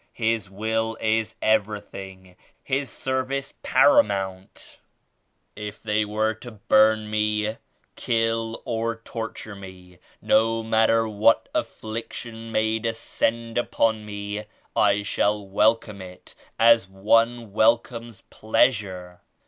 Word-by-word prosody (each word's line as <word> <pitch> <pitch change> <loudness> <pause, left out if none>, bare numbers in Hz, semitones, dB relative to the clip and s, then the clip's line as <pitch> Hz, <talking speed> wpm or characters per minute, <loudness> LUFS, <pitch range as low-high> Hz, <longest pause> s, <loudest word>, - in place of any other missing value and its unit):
His 110 -3 -1
Will 110 +3 -2
is 110 0 0
everything; 100 -3 -2 0.3
His 135 0 -1
service 130 +1 -3
paramount. 95 - +1 0.8
If 105 0 -8
they 105 0 +1
were 110 +1 0
to 115 +3 -11
burn 110 +1 +3
me, 105 0 +1
48 110 +1 -3 0.4
kill 115 0 -1
or 115 0 -1
torture 115 -2 -7
me; 90 -2 -12
— - - -31
no 115 +1 +2
matter 110 0 +3
what 110 +1 +3
affliction 115 +1 -5
may 110 0 +1
descend 115 +1 -1
upon 110 -2 0
me, 105 0 -5 0.3
I 105 -1 +3
shall 105 0 0
welcome 105 +1 +1
it 90 -1 -12 0.2
as 115 -3 +5
one 115 +3 +1
welcomes 115 0 +1
pleasure. 95 -6 0
110 Hz, 110 wpm, -24 LUFS, 105-115 Hz, 0.8 s, as